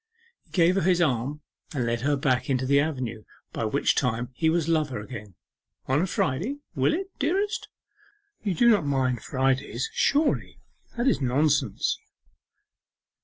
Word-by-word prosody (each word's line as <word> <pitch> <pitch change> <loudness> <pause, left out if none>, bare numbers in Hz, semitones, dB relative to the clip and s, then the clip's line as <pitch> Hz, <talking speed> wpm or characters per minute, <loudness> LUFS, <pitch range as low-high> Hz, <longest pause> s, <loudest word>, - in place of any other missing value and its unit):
He - - -32
gave 175 -1 +3
her 195 - +1
his 180 +1 +3
arm 145 -1 0 0.3
and 125 -4 0
led 115 0 -1
her 145 +3 +2
back 135 -3 0
into 130 -1 +1
the 140 +2 +4
avenue, 130 -7 -2 0.3
by 115 - -2
which 140 +6 +2
time 125 -2 0
he 160 +5 +1
was 165 -1 +1
lover 155 -7 0
again. 105 -3 -9 0.5
'On 135 +4 +2
a 185 - 0
Friday, 175 - -1 0.2
will - - +2
it, 385 +2 -5
dearest? 395 +9 0 0.7
You 200 -4 -1
do 240 - +4
not 210 -7 +5
mind 130 -4 0
Fridays, 130 -2 -1
surely? 295 +2 +1 0.4
That's 240 - +2
nonsense. 140 +4 +1
140 Hz, 150 wpm, -26 LUFS, 125-175 Hz, 0.7 s, not